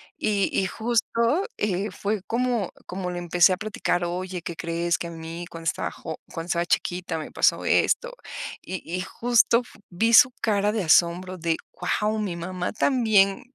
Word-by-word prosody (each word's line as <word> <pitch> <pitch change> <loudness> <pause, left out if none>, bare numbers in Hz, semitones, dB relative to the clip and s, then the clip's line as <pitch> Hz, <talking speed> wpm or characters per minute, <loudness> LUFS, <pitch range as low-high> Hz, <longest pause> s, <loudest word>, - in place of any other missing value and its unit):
Y 200 -2 +1
y 190 - +1
justo, 235 - 0
eh, 205 0 -1
fue 205 0 -2
como 235 -4 0 0.2
como 180 0 -4
le 175 - -4
empecé 175 +1 +4
a 185 - +1
platicar: 200 -4 -1
"Oye, 180 0 -4
¿qué 170 - -5
crees?, 170 0 -1
que 170 - -4
a 170 - -7
mí 165 +1 -7
cuando 165 0 -9
estaba 165 - -1
jo 160 - -7
cuando 165 - -5
estaba 170 -1 0
chiquita 175 -2 -1
me 155 - -6
pasó - - +2
esto". - - +2 0.5
Y 185 -2 -6
y 180 +3 -3
justo 235 +4 +3
f 240 - -17
vi 225 +6 +1
su 250 +3 +9
cara 205 -2 +2
de 215 -2 -1
asombro 175 +3 +3
de: 165 -1 0 0.2
"Guau, 210 +4 -1
mi 195 -5 -2
mamá 180 +1 -4
también 215 -6 +3
185 Hz, 175 wpm, -25 LUFS, 175-215 Hz, 0.5 s, su